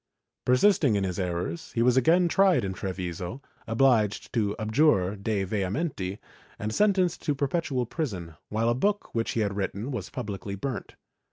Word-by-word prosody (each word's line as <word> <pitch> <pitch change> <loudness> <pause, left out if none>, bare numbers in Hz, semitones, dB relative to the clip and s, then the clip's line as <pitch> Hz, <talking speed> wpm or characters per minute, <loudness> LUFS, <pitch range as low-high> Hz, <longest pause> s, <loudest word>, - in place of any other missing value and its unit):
Persisting 130 - +4
in 100 - +1
his 90 -1 -2
errors, 90 - -3
he 115 - +2
was 125 0 +4
again 165 +8 +4
tried 190 - +4
in 95 - -2
Treviso, 90 +3 -4 0.3
obliged 115 -3 +2
to 105 -4 +1
abjure 110 -4 +2
de 100 -1 -1
vehementi 100 - -2 0.4
and 105 +1 -3
sentenced 185 - +2
to 145 - 0
perpetual 140 -2 -1
prison, 100 - -4 0.2
while 110 +2 +1
a - - +3
book 200 +11 -1
which 115 -1 -1
he 115 - 0
had 100 -2 -1
written 100 +5 -3
was 105 -8 -4
publicly 100 -1 -5
burnt. 125 +2 -5
115 Hz, 160 wpm, -27 LUFS, 100-140 Hz, 0.4 s, Persisting